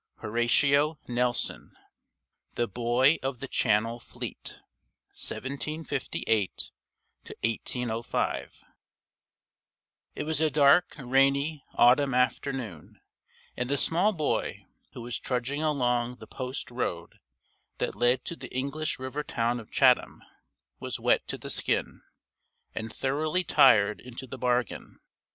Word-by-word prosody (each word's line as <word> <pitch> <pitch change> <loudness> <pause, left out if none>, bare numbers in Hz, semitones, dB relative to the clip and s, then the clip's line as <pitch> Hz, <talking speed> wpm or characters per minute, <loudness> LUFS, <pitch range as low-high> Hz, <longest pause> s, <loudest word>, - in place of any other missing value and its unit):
XI - - -28
Horatio 140 +7 +3
Nelson 125 0 -1 0.8
The 120 - 0
Boy 120 +7 +3
of 130 -2 -3
the 135 - -5
Channel 115 0 +1
Fleet: - - -5 0.5
1758 140 - -2 0.7
1805 115 0 -2 1.5
It - - -3
was 155 0 0
a 160 - +4
dark, 150 +4 +4
rainy 140 +3 +2
autumn 130 +2 +5
afternoon, 125 - -2 0.6
and 125 +1 -2
the 140 - +1
small 175 +9 +3
boy, 155 -7 -2 0.3
who 120 - -8
was 120 -1 -3
trudging 130 +3 -2
along 125 -5 +1
the - - -12
post 130 0 -5
road 85 -9 -4 0.6
that - - -1
led 120 +1 +2
to 170 - -4
the - - -9
English 140 +4 -2
river 130 +3 -4
town 120 -4 -1
of 110 - -12
Chatham, - - +3 0.6
was - - -4
wet - - +2
to - - -3
the - - -6
skin, - - -1 0.7
and 110 0 -4
thoroughly 155 +8 0
tired 105 -10 +5
into 125 +1 -8
the 125 - -8
bargain. 125 -3 -1
130 Hz, 115 wpm, -28 LUFS, 120-145 Hz, 1.5 s, autumn